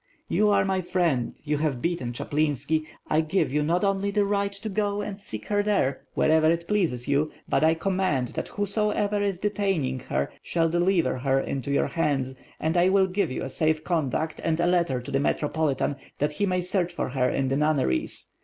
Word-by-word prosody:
'' - - -41
"You 210 0 +3
are 200 - +3
my 190 -1 0
friend, 170 -9 0
you 150 -1 -1
have 150 -5 0
beaten 165 -6 -2
Chaplinski, 150 +4 -1 0.2
I 155 - +3
give 155 -3 0
you 150 - +2
not 170 +5 +1
only 195 0 +1
the 205 0 +2
right 200 0 0
to 200 +2 -7
go 205 0 -1
and 200 -1 -5
seek 110 - -7
her 205 -1 +2
there, 200 -10 0
wherever 155 0 +4
it 170 +1 0
pleases 165 - 0
you; 145 +2 +1 0.2
but - - +1
I 160 +1 +4
command 175 -8 0
that - - -4
whosoever 205 0 0
is 200 -2 0
detaining 190 -10 -1
her 70 - -1
shall 165 -1 0
deliver 175 -4 +1
her 135 +1 +2
into 135 0 -3
your 140 - +2
hands, 135 -5 0 0.3
and 160 +2 0
I 175 +2 +5
will 195 0 +4
give 190 -1 0
you 130 - -4
a 135 - -4
safe 155 +1 +1
conduct 160 -2 -1
and 165 0 0
a 170 - +3
letter 170 -8 +2
to 125 - -8
the 135 - +2
Metropolitan, 145 -1 0 0.2
that 150 +1 0
he 200 +7 -1
may 180 -1 +1
search 180 -1 0
for 175 - -3
her 125 -1 +1
in 135 0 0
the 135 - +1
nunneries. 145 - 0
165 Hz, 205 wpm, -26 LUFS, 140-195 Hz, 0.3 s, I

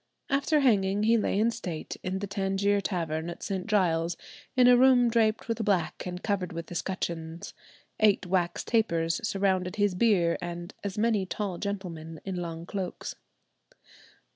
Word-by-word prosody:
After 285 +2 +2
hanging 205 -5 +3
he 225 +2 +4
lay 215 -3 +1
in 225 +2 +3
state 170 -8 -5
in 185 +1 -2
the 200 - -3
Tangier 200 0 0
Tavern 165 -4 -2
at 170 - -8
St. 195 -1 -3
Giles, 170 -5 +1 0.4
in 250 -1 +6
a 250 - +8
room 245 -1 +5
draped 225 -2 +2
with 230 -1 -1
black 190 -4 0
and 180 0 -6
covered 195 -4 -1
with 165 0 -6
escutcheons; 170 -1 -4 0.5
eight 205 -3 +4
wax 175 -1 0
tapers 170 -5 +1
surrounded 190 -3 0
his 205 -2 +2
bier, 180 -4 +2
and 175 +2 -6
"as 200 0 -4
many 210 -3 +1
tall 195 -3 -3
gentlemen 170 -6 -5
in 190 -1 -3
long 170 -1 -5
cloaks." 190 -1 -4
195 Hz, 155 wpm, -28 LUFS, 175-215 Hz, 0.5 s, a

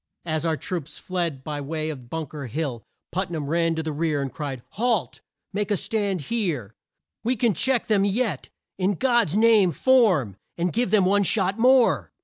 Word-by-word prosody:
As 160 0 -1
our 160 -1 0
troops 165 -4 -5
fled 170 -7 -3
by 145 0 -4
way 155 +2 -3
of 130 -5 -10
Bunk 160 -1 -5
er 145 -3 -6
Hill, 135 -2 -3 0.3
Put 185 +1 -2
nam 160 -4 -3
ran 165 +2 +1
to 160 - -2
the 160 - -3
rear 155 0 0
and 135 -2 -3
cried, 140 -6 -5
"Halt! 230 -2 -1 0.3
make 205 0 -1
a 205 - +2
stand 200 -3 -1
here! 150 - -2 0.5
We 245 +3 +1
can 230 -1 +2
check 255 +7 +1
them 205 -3 +2
yet! 210 +2 -1 0.3
In 190 +2 +1
God's 240 - +2
name 215 -5 +5
form, 185 - +3 0.2
and 175 0 -1
give 240 -1 +1
them 200 -2 +4
one 200 +2 +3
shot 195 +1 +1
more!" 255 0 +4
180 Hz, 185 wpm, -24 LUFS, 155-215 Hz, 0.5 s, name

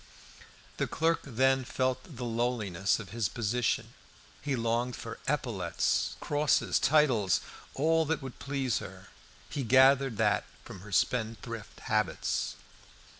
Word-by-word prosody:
The - - 0
clerk 165 +1 +1
then 130 +1 +2
felt 130 +4 -2
the 125 - -4
lowliness 115 -5 0
of 105 -4 -8
his 110 -5 -1
position; 120 +1 -1 0.5
he 140 -2 -1
longed 120 +1 0
for 115 0 -7
epaulettes, 115 - 0
crosses, 145 0 +2
titles. 120 - +3 0.4
All 160 +3 +3
that 160 +1 0
would 130 -2 -8
please 135 -5 -1
her - - -10 0.4
he 145 - -4
gathered 130 0 +5
that - - +2 0.2
from - - -9
her 105 +1 -11
spendthrift 115 0 -2
habits. 110 0 -1
125 Hz, 125 wpm, -30 LUFS, 110-135 Hz, 0.5 s, gathered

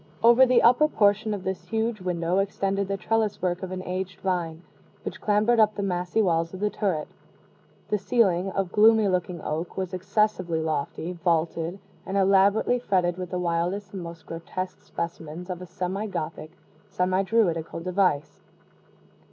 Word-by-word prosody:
Over 240 +3 +7
the 250 -1 +4
upper 250 +6 +6
portion 210 -4 +2
of 200 -3 -3
this 190 -1 -4
huge 225 -1 -1
window 180 0 0
extended 195 0 -1
the 195 0 -2
trellis 220 +1 0
work 180 -1 -1
of 190 - -5
an 185 0 -4
aged 185 0 -4
vine, 175 -3 -2 0.4
which - - -6
clambered 215 +3 +3
up 215 -1 +4
the 200 - -2
massy 180 +2 0
walls 165 -1 0
of - - -8
the 210 +1 0
turret. 180 -8 -1 0.8
The 210 - +1
ceiling, 195 -5 +2
of 195 -2 -1
gloomy 220 0 +5
looking 180 -2 -1
oak, 160 +3 -4
was 185 -2 -3
excessively 185 -3 0
lofty, 160 +2 -2
vaulted, 170 0 0 0.3
and 195 - -3
elaborately 195 +5 +4
fretted 180 -6 +1
with 180 -1 -4
the 180 - -3
wildest 180 +3 -1
and 190 - -5
most 170 -1 -9
grotesque 175 +3 -6
specimens 170 +1 -6
of 180 0 -5
a 180 - -8
semi 185 +3 -3
Gothic, 160 -3 -5 0.4
semi 185 0 +1
Druidical 190 -7 0
device. 180 -5 0
185 Hz, 160 wpm, -26 LUFS, 175-205 Hz, 0.8 s, Over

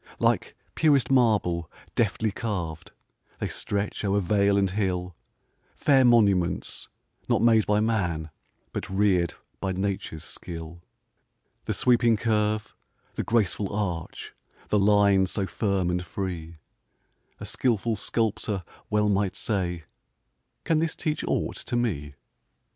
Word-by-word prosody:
Like - - +1 0.2
purest 145 -5 +3
marble, 105 -10 +2 0.2
deftly 110 -1 +1
carv'd, 90 -8 -4 0.5
They - - -2
stretch 100 +1 -3
o'er 100 0 +2
vale 100 +1 +2
and 95 -2 +2
hill, 90 -3 -1 0.6
Fair 135 -3 +4
monuments, 100 -8 +2 0.4
not - - +3
made 115 -2 +5
by 105 0 +3
man, 90 -8 -1 0.4
But - - -4
rear'd 95 -3 +2 0.2
by 95 -1 -2
nature's 95 -4 -3
skill. 85 0 -8 0.8
The - - -1
sweeping 120 -2 +3
curve, 105 -1 0 0.4
the - - -2
graceful 105 -3 0
arch, 90 -6 -4 0.4
The 105 - +3
line 100 -1 +4
so 95 +2 -2
firm 95 -3 0
and 90 0 -1
free; 85 -3 -5 0.8
A - - -6
skilful 115 -2 0
sculptor 105 -2 -1 0.3
well 105 0 +2
might 100 -1 +1
say: 90 -5 -2 0.8
"Can 160 -2 +2
this 165 0 0
teach 155 -1 -2
aught - - -1
to - - -4
me?" 75 -13 -1
100 Hz, 120 wpm, -26 LUFS, 90-110 Hz, 0.8 s, made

